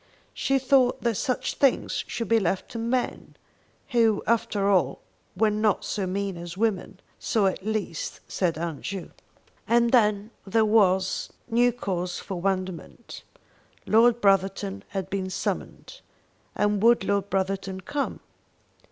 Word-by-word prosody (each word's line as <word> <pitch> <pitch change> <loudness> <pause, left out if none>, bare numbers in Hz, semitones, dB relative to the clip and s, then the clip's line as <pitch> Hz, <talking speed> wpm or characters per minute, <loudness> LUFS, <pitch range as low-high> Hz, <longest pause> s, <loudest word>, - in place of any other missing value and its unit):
She 270 - +1
thought 260 -1 +2
that 235 -1 +2
such 255 +4 -1
things 275 -3 +1
should 230 - -4
be 230 +3 +4
left 190 -1 -2
to 230 - -5
men, 245 +2 -2 0.5
who 225 -3 +2
after 215 -3 +1
all 195 -2 +2 0.4
were 220 -1 +3
not 210 0 +1
so 195 -3 -2
mean 195 0 -2
as 170 +1 -8
women; 195 -3 -1 0.2
so, 215 -3 +1
at 190 0 -1
least, 215 -6 -3
said 170 -4 -1
Aunt 165 -3 -4
Ju. 195 -2 -5 0.6
And 235 +1 +3
then 210 -3 +3 0.2
there 220 +3 +3
was 190 -3 +2 0.2
new 240 +2 +3
cause 180 -6 -3
for 185 -3 -6
wonderment. 185 -2 -4 0.6
Lord 235 +2 +4
Brotherton 195 0 +1
had 190 -2 -4
been 190 -1 -2
summoned, - - -5 0.5
and 205 -1 +1
would 235 -1 +5
Lord 200 0 0
Brotherton 195 0 -2
come? 280 +9 -3
200 Hz, 135 wpm, -26 LUFS, 190-230 Hz, 0.6 s, would